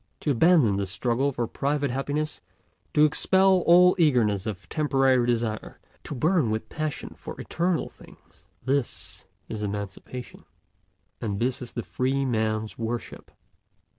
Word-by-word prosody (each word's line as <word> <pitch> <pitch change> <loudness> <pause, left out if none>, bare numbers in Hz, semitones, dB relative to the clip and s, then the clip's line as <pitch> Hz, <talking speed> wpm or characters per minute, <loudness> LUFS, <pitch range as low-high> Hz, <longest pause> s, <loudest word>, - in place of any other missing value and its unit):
To 150 - +1
abandon 140 - +4
the 100 -1 -1
struggle 120 +7 0
for 120 -2 -2
private 140 +3 -1
happiness, 145 +3 -2 0.5
to 150 - +6
expel 190 +5 +4
all 180 +1 +7
eagerness 115 - +2
of 95 -6 -6
temporary 135 - +2
desire, 115 -3 -2 0.3
to - - -5
burn 155 - +2
with 110 0 -3
passion 155 -2 -4
for - - -9
eternal 175 0 -1
things—this 135 +1 -5 0.2
is 110 - -5
emancipation, 105 +4 -6 0.8
and 100 -3 -2
this 130 +3 0
is 125 - -7
the 120 - -4
free 135 +2 -1
man's 110 -3 -1
worship. 115 +1 -5
125 Hz, 130 wpm, -26 LUFS, 110-150 Hz, 0.8 s, all